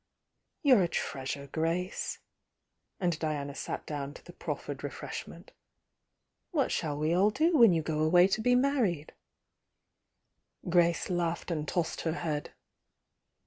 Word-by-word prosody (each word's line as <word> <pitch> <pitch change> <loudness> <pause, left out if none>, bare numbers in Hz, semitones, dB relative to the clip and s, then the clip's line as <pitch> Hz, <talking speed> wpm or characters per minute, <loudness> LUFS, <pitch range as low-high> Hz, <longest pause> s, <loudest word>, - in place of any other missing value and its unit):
"You're 260 -8 +6
a 175 - +3
treasure, 140 -3 -3
Grace!" 165 +6 -2 0.4
— - - -52
and 175 -5 0
Diana 145 -3 -2
sat - - -5
down 145 -1 -5
to - - -14
the - - -11
proffered - - -5
refreshment. - - -7 1.0
"What 295 -7 +1
shall 150 -3 -1
we 155 +2 +1
all 190 +4 +4
do 320 +10 +2
when 235 -8 +8
you 165 -2 +1
go 155 -1 -2
away 175 +4 +6
to 215 - 0
be 245 +2 +4
married?" 245 - +1 1.5
Grace 170 +1 +2
laughed 175 0 -1
and 155 -2 -2
tossed 170 +1 -1
her 160 - -1
head. 155 -3 -3
170 Hz, 140 wpm, -30 LUFS, 155-195 Hz, 1.5 s, when